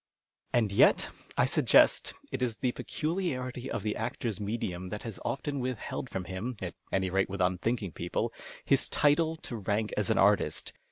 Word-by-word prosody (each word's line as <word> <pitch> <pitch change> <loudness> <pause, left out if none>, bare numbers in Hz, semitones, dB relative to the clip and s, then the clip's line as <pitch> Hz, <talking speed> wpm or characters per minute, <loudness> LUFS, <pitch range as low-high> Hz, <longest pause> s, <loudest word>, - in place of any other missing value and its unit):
And 110 -4 +2
yet, 100 - +5 0.3
I - - +5
suggest, - - +4 0.2
it 130 - -3
is 120 -3 0
the 125 -2 0
j^eeuliarity 135 -7 -2
of - - -3
the 105 -1 -1
actor's 110 -1 -3
medium 100 -4 -3
that 105 +2 -5
has 110 -6 -6
often 140 +3 -2
witliheld 125 0 -3
from 95 - -3
him, 100 +7 -4
at 90 -2 -4 0.2
any 95 -1 +1
rate 95 0 +2
with 100 +1 -4
unthinking 95 +3 0
people, - - -2 0.3
his - - +3
title 155 +2 +3
to 125 -6 -7
rank 105 +1 -1
as 105 -3 0
an - - +3
artist. 100 0 +3
110 Hz, 170 wpm, -30 LUFS, 95-125 Hz, 0.3 s, yet